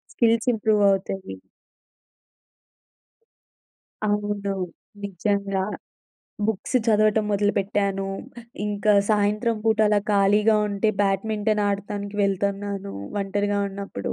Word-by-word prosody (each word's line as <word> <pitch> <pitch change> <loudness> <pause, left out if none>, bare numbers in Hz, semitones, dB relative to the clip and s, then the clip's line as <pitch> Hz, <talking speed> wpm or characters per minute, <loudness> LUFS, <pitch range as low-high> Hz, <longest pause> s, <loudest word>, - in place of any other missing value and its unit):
Skills 230 +1 +3
ఇంప్రూవవుతాయి. 200 - +1 2.7
అవును. 205 -1 -1 0.5
నిజంగా 200 0 -1 0.8
books 220 +4 -1
చదవటం 215 -1 +3
మొదలుపెట్టాను. 200 -1 0 0.6
ఇంకా 210 +1 +1 0.2
సాయంత్రం 210 +3 +1
పూట 220 -1 +2
అలా 210 0 +4
ఖాళీగా 210 +2 +4
ఉంటే 205 +2 0
బ్యాడ్మింటన్ 210 +2 0
ఆడతానికి 200 0 -4
వెళ్తన్నాను 200 0 -1 0.3
ఒంటరిగా 205 +1 -1
ఉన్నప్పుడు. 195 - -5
205 Hz, 75 wpm, -24 LUFS, 195-210 Hz, 2.7 s, అలా